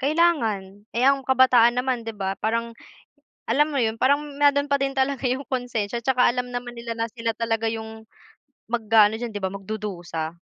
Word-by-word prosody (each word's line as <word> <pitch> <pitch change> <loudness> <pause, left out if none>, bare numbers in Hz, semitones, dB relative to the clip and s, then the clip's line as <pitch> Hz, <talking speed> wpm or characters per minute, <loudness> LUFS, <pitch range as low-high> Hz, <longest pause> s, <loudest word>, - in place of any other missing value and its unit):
kailangan. 230 - 0
Eh, 245 - +1
ng 275 -1 +3
kabataan 250 -2 +5
naman, 250 -2 -1
'di 225 - -5
ba, 195 0 -3
parang, 230 +1 -1 0.8
alam 295 +2 +3
mo, 280 - -2
'yon 220 -1 +1
parang 285 +2 +4 0.2
mayro'n 285 0 +3
pa - - +5
din 275 0 +1
talaga 265 0 0
'yong 260 +2 -2
konsensya 240 -3 -2
'tsaka 255 0 +2
alam 250 0 -1
naman 245 0 -5
nila 235 -1 -6
na 230 0 -1
sila 230 0 -3
talaga 225 -1 0
'yong 220 0 -7 0.7
mag-aano 220 -2 +3
diyan, 235 0 -5
'di 205 - -5
ba, 190 - 0
magdudusa. 185 -5 -5
235 Hz, 180 wpm, -24 LUFS, 220-260 Hz, 0.8 s, kabataan